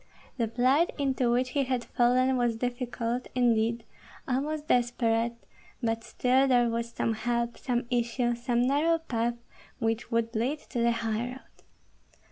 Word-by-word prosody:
The 230 -3 +1
plight 255 +8 +2
into 265 -3 +1
which 250 +1 +1
he 280 0 +1
had 255 -2 -1
fallen 255 +2 +2
was 240 -2 +1
difficult, 245 0 -3
indeed, 230 -2 +2 0.4
almost 295 +4 -2
desperate; 235 -1 +1 0.5
but 225 0 0
still 260 +3 +2
there 245 -2 +4
was 230 0 -2
some 230 -1 -1
help, 235 +1 -1
some 245 -2 -2
issue, 240 0 +1
some 240 0 0
narrow 300 +5 +3
path 240 -7 -2 0.4
which 225 -1 -1
would 230 0 -1
lead 250 +7 0
to 245 - -2
the 235 0 +3
highroad. 230 +3 -2
240 Hz, 140 wpm, -28 LUFS, 230-255 Hz, 0.5 s, there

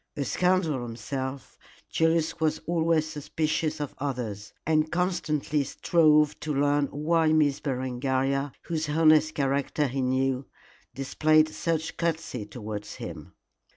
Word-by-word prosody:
A 140 - -1
scoundrel 180 -3 +1
himself, 130 +3 -5 0.3
Julius 165 0 +1
was 155 -1 +1
always 165 -2 +2
suspicious 155 +1 -2
of 145 -2 -4
others, 120 -7 -4
and 155 0 +2
constantly 155 -5 0
strove 150 0 +3
to 155 - -3
learn 145 +1 +2
why 160 +2 +1
Miss 145 -2 +3
Berengaria, 135 +1 -1
whose 160 -2 -2
honest 155 0 +4
character 140 +1 0
he 135 0 -2
knew, 130 +1 0 0.5
displayed 155 +3 +3
such 160 0 -2
courtesy 165 -10 -2
towards 105 -3 -6
him. 80 -4 -8
150 Hz, 120 wpm, -27 LUFS, 130-160 Hz, 0.5 s, honest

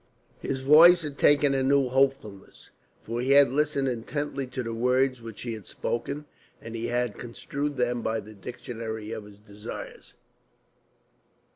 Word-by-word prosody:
His 135 -1 -3
voice 165 +5 +7
had 145 -2 -6
taken 145 -1 +4
a 135 - +1
new 135 0 +3
hopefulness. 130 -6 -1 0.3
For 115 +2 -4
he 135 +2 +2
had 140 -2 +6
listened 145 -1 +1
intently 135 +3 -3
to 125 0 -4
the 115 0 -4
words 125 +2 +1
which 115 -3 -9
she 120 -2 -4
had 110 -5 -9
spoken, 140 +5 -4 0.3
and 115 - -9
he 115 +1 -3
had 120 -3 -1
construed 140 +4 -4
them 120 -1 0
by 110 0 -1
the 110 +1 -11
dictionary 110 0 -7
of 110 -2 -6
his 105 -1 -14
desires. 105 +1 -10
125 Hz, 155 wpm, -27 LUFS, 115-140 Hz, 0.3 s, voice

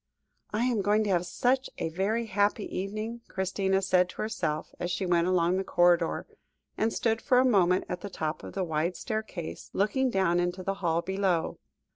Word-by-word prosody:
"I 220 +3 0
am 240 -5 +1
going 210 +2 +3
to 205 - 0
have 175 -1 +1
such 255 +9 +1
a - - -2
very 200 +7 0
happy 205 0 +1
evening," 215 +5 -4
Christina 190 0 0
said 180 -1 +3
to - - -5
herself, 155 -8 -3
as 175 0 -2
she 185 +2 -1
went 175 -1 +2
along 180 0 +2
the 190 - 0
corridor, 175 -2 +2 0.5
and 220 +1 +1
stood 225 -2 0
for 255 - +3
a 255 - +5
moment 185 -6 +3
at 180 - -4
the 205 - -5
top 155 -4 -3
of - - -8
the 195 - 0
wide 165 +1 -1
staircase, 215 -7 -5
looking 255 +7 +1
down 190 -5 +2
into 175 +1 -1
the 195 +2 -1
hall 170 -1 +1
below. 190 -4 0
190 Hz, 190 wpm, -28 LUFS, 175-215 Hz, 0.5 s, a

